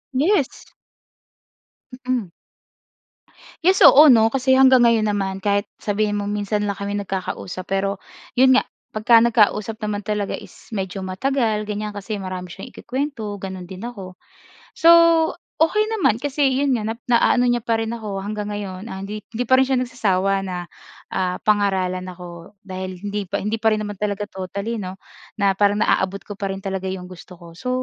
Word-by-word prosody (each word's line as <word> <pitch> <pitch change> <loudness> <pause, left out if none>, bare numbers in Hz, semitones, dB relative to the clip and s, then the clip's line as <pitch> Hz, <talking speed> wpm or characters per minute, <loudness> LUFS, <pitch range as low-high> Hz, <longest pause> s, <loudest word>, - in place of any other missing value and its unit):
Yes! 295 0 +1 1.4
Mm. 240 -9 -1 1.3
Yes, 375 +3 +4
oo 300 +2 +9
'no, 225 -3 +5
kasi 260 0 +3
hanggang 260 -1 +6
ngayon 225 -2 +3
naman 195 -2 -1
kahit 200 0 0
sabihin 205 0 -1
mo, 205 - -2
minsan 205 0 -1
lang 200 - -1
kami 200 0 -3
nagkakausap 185 -2 -5
pero 195 0 -1 0.3
iyon 260 +1 +5
nga - - +3 0.3
pagka 225 +2 +5
nagkausap 220 -2 +2
naman 210 -1 -2
talaga 210 -1 -2
is - - -15
medyo 195 -1 -3
matagal, 215 +3 -1
ganyan 210 0 -3
kasi 205 +1 -5
marami 185 -1 -6
siyang 195 +6 -9
ikukuwento, 250 -6 -4
ganon 190 -2 -6
din 190 +2 -8
ako. 195 -6 -8 0.6
So 330 - +4 0.7
okey 425 +7 +3
naman 360 - +2
kasi 285 0 +1
iyon 280 -1 +2
nga 220 - -2
na 225 - -1
naa-ano 245 +1 +3
niya 240 0 +1
pa 230 0 +1
rin 225 0 -2
ako 210 -4 -5
hanggang 210 0 -4
ngayon. 205 0 -6
Ah, 190 - -6
hindi 210 +2 -6
hindi 240 +2 -3
pa 260 - +5
rin 265 - +4
siya 265 -1 +1
nagsasawa 205 -6 0
na, 185 -2 -4 0.6
ah, 180 -1 -1
pangaralan 190 -3 +1
ako 175 +1 -11
dahil 185 -1 -6
hindi 205 0 -5
pa - - -1
hindi 210 +3 -1
pa 220 0 +3
rin 215 - -3
naman 205 -1 -5
talaga 205 0 -2
totally 200 +4 -5
'no 185 0 -6 0.4
na 200 -1 +3
parang 205 +1 +2
na-aabot 195 -2 0
ko 205 - -8
pa 195 -1 -2
rin 195 - -5
talaga 190 -1 -3
iyong 185 -1 -5
gusto 180 0 -12
ko. 170 -1 -13
So 215 +9 -6
205 Hz, 175 wpm, -21 LUFS, 190-235 Hz, 1.4 s, oo